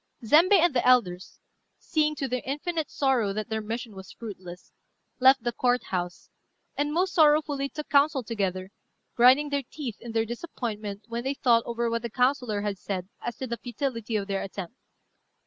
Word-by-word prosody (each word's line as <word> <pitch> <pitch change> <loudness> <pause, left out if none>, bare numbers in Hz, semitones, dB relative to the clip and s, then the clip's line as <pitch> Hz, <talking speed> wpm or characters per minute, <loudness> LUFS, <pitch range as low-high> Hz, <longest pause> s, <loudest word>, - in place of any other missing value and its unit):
Zembei 335 - +6
and 345 -3 +3
the 245 - +1
elders, 195 -8 +2 0.4
seeing, 305 -2 0
to 275 - -3
their 250 0 -2
infinite 305 +4 -3
sorrow, 255 -8 +1
that 215 +1 -4
their 220 0 -2
mission 225 +1 -5
was 190 -1 -11
fruitless, 185 -5 -10 0.5
left 260 -1 +6
the 240 - 0
Court 245 +1 +1
house, 175 -1 -3 0.5
and 290 +1 -1
most 365 +4 0
sorrowfully 295 -3 +3
took 300 +1 -7
counsel 280 -1 +3
together, 195 -4 -3 0.4
grinding 260 +5 +5
their 285 -1 0
teeth 255 -3 -7
in 235 - -7
their 225 0 +1
disappointment 220 -5 -5
when 235 +1 -4
they 270 +2 -1
thought 235 -4 +4
over 235 0 -1
what 230 0 -1
the 235 - -4
councillor 250 -3 +1
had 205 -2 -3
said 185 -1 -4
as 240 -2 -5
to 260 - -4
the 235 -2 -4
futility 235 -1 -4
of 205 -2 0
their 195 -1 -1
attempt. 195 -1 -6
240 Hz, 180 wpm, -27 LUFS, 210-280 Hz, 0.5 s, Zembei